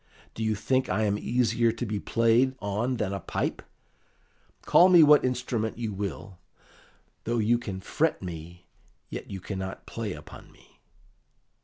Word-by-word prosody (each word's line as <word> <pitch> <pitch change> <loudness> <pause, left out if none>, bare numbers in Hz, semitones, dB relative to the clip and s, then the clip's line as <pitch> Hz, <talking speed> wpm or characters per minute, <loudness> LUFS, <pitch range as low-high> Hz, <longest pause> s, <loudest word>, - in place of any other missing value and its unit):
Do 110 - -4
you 110 -1 +1
think 130 +5 0
I 110 +4 +1
am 105 -1 0
easier 115 -1 +1
to 115 +2 -4
be 105 -2 -3
played 115 +5 +2
on 110 +5 -1
than 100 -3 -2
a 100 - -3
pipe? - - -3 1.0
Call 180 +2 +6
me 175 -3 +8
what 150 -1 +6
instrument 125 -3 -2
you 115 -3 -3
will, 100 -1 -6 0.9
though 120 +1 0
you 115 +2 +2
can 100 -6 -6
fret 155 - 0
me, 85 0 -8 0.5
yet - - -6
you 95 - -5
cannot 95 0 -6
play 110 -4 -4
upon 75 - -12
me." - - -24
110 Hz, 155 wpm, -27 LUFS, 100-120 Hz, 1.0 s, me